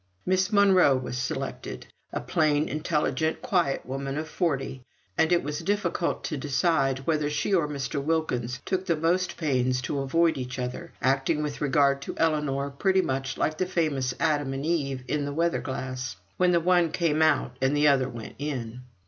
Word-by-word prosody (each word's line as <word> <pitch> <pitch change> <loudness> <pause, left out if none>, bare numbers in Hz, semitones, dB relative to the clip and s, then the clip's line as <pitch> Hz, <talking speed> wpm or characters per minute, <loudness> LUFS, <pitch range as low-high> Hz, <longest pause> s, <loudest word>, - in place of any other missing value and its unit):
Miss 185 +2 +1
Monro 190 -9 +5
was 125 -1 -5
selected 125 0 -4 0.3
a - - -3
plain, 155 -1 +1
intelligent, 155 - -1
quiet 180 - +1
woman 135 +2 -4
of 155 +1 -3
forty 140 -6 -2 0.3
and 160 - +2
it 175 - +3
was 145 +1 -3
difficult 190 -4 -1
to 150 - -3
decide 135 -1 +1
whether 155 -2 +1
she 150 +6 -1
or 170 -5 +3
Mr. 140 -1 -3
Wilkins 125 -6 -1
took 190 0 -1
the 170 - +3
most 170 +4 0
pains 130 -5 +1
to 140 - -2
avoid 165 +4 +2
each 125 0 -5
other, 125 +7 -5
acting 135 +4 +2
with 145 -1 -4
regard 140 -1 +3
to - - -6
Ellinor, 150 -3 0
pretty 190 +6 +2
much 135 0 -2
like 155 0 -1
the 185 - +1
famous 150 -8 0
Adam 145 -4 +1
and 135 +2 -4
Eve 140 -6 -1
in 145 -1 -1
the 145 - -3
weather 170 +2 +1
glass: 130 -3 -4 0.2
when 180 -1 +4
the 170 - +4
one 175 -1 +3
came 160 -2 +1
out 145 -5 +2
the 145 +3 +3
other 135 -2 +3
went 115 -3 -8
in. 125 -5 -4
150 Hz, 175 wpm, -27 LUFS, 135-165 Hz, 0.3 s, Monro